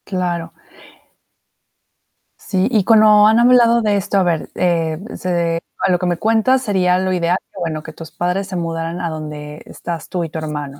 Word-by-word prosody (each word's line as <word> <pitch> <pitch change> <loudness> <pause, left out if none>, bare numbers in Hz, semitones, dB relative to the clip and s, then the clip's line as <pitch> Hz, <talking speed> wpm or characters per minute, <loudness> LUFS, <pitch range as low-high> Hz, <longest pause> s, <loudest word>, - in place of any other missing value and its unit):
Claro. 175 -3 -3 1.9
Sí, 190 0 -1
y 215 -5 +2
cuando 215 -1 +6
han 220 +2 +4
hablado 235 -1 +5
de 210 -2 +1
esto, 200 +1 -1
a 190 - +3
ver, 170 -3 -1
eh, 165 -3 0 0.2
se 170 -2 -1 0.2
a 190 - +3
lo 180 - +2
que 180 - -2
me 175 -1 0
cuentas 225 +6 +2
sería 185 -6 +1
lo 185 0 -1
ideal 175 0 +1
que, - - -11
bueno, 155 -3 -3
que 160 - -10
tus 160 0 -11
padres 180 +2 -2
se 190 - -6
mudaran 165 0 -3
a 170 - -2
donde 150 -1 -7
estás 170 -2 -7
tú 180 -2 -2
y 165 - -5
tu 160 - -7
hermano, 145 -2 -6
180 Hz, 190 wpm, -18 LUFS, 165-200 Hz, 1.9 s, cuando